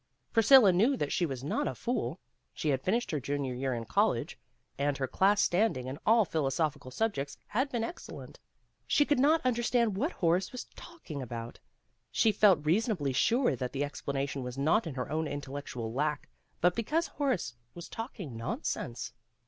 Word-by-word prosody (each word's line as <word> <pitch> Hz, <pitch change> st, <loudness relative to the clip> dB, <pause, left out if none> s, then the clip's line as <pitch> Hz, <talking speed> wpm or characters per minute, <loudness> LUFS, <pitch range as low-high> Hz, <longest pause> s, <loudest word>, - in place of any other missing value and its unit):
Priscilla 225 Hz, -3 st, +7 dB
knew 235 Hz, +10 st, +3 dB
that 145 Hz, -, -2 dB
she 175 Hz, -, +1 dB
was 135 Hz, -3 st, -5 dB
not 145 Hz, -, -1 dB
a -, -, -3 dB
fool. 235 Hz, -, -2 dB, 0.4 s
She 155 Hz, -, -1 dB
had 135 Hz, -2 st, +1 dB
finished 230 Hz, -, 0 dB
her 150 Hz, -, 0 dB
junior 140 Hz, -1 st, -2 dB
year 130 Hz, 0 st, -2 dB
in 115 Hz, -1 st, -4 dB
college, -, -, +1 dB, 0.4 s
and 140 Hz, 0 st, +1 dB
her 135 Hz, -, 0 dB
class 200 Hz, +9 st, +3 dB
standing 175 Hz, -, +1 dB
in 130 Hz, +3 st, -5 dB
all 225 Hz, -1 st, +6 dB
philosophical 150 Hz, -3 st, -1 dB
subjects 140 Hz, -, -2 dB
had 260 Hz, +6 st, -1 dB
been 235 Hz, -2 st, -1 dB
excellent. 340 Hz, -, -8 dB
If -, -, -40 dB, 0.5 s
she 290 Hz, -, +4 dB
could 290 Hz, -3 st, +2 dB
not 300 Hz, +2 st, +4 dB
understand 240 Hz, -3 st, +2 dB
what 285 Hz, -, -1 dB
Horace 175 Hz, +2 st, +1 dB
was 250 Hz, -, -5 dB
talking 250 Hz, -, -8 dB
about, 115 Hz, -2 st, -6 dB, 0.5 s
she 220 Hz, -, +3 dB
felt 190 Hz, -7 st, +4 dB
reasonably 175 Hz, -, +1 dB
sure 235 Hz, -, +3 dB
that 125 Hz, 0 st, -4 dB
the 140 Hz, +1 st, 0 dB
explanation 140 Hz, -1 st, -3 dB
was 125 Hz, 0 st, -6 dB
not 160 Hz, +9 st, +2 dB
in 145 Hz, -, -5 dB
her 130 Hz, +1 st, -4 dB
own 160 Hz, 0 st, 0 dB
intellectual 140 Hz, -5 st, -5 dB
lack 150 Hz, +3 st, -1 dB, 0.3 s
but 175 Hz, +1 st, +4 dB
because 305 Hz, +9 st, 0 dB
Horace 265 Hz, -, -1 dB, 0.2 s
was 175 Hz, 0 st, -8 dB
talking 205 Hz, -, -7 dB
nonsense. 125 Hz, -, -4 dB
160 Hz, 175 wpm, -30 LUFS, 135-225 Hz, 0.5 s, Priscilla